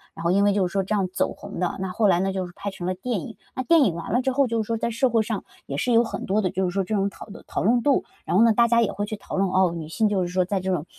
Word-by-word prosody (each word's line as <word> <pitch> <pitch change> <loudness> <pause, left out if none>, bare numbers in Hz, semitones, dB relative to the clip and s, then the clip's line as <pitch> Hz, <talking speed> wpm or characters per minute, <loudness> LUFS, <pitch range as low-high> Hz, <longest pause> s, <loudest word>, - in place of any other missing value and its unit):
然 - - -8
后 170 - +2
因 200 +2 +3
为 205 - +4
就 190 -3 +1
是 - - -10
说 195 - +1
这 195 - -3
样 195 -3 +1
走 - - 0
红 - - -9
的。 180 - -1
那 190 - -2
后 210 +3 +2
来 175 - +3
呢， 190 +1 0
就 190 -1 -2
是 175 - -10
拍 200 - -4
成 190 -2 -7
了 185 - 0
电 210 +1 -3
影。 225 - -9 0.2
那 255 - -2
电 325 +4 +5
影 170 -5 0
完 170 - -6
了 245 - +2
之 265 +1 0
后 275 0 +3
就 230 -1 0
是 215 - -6
说 230 - 0
在 235 - -1
社 245 +3 +2
会 225 -1 +2
上 220 -1 -3 0.2
也 140 - -5
是 240 +10 +1
有 230 +1 +6
很 - - -5
多 205 +3 +1
的 185 - 0
就 190 0 -1
是 180 - -1
说 195 +2 0
这 200 +4 -4
种 200 0 +1
讨 - - -11
论 210 +1 -11
讨 - - -2
论 235 +4 +3
度， 280 +1 +2 0.2
然 - - -1
后 215 - +6
呢， 230 - +6
大 235 +1 +4
家 235 0 +4
也 220 - +1
会 205 - -3
去 215 +1 -5
讨 200 - -7
论， 195 0 +2
哦， 185 -1 +3
女 160 -2 -6
性 210 +6 +1
就 195 -2 +1
是 - - -2
说 180 +1 +1
在 195 +1 -1
这 190 +1 -2
种， 150 -3 -2
200 Hz, 395 characters per minute, -24 LUFS, 185-230 Hz, 0.2 s, 有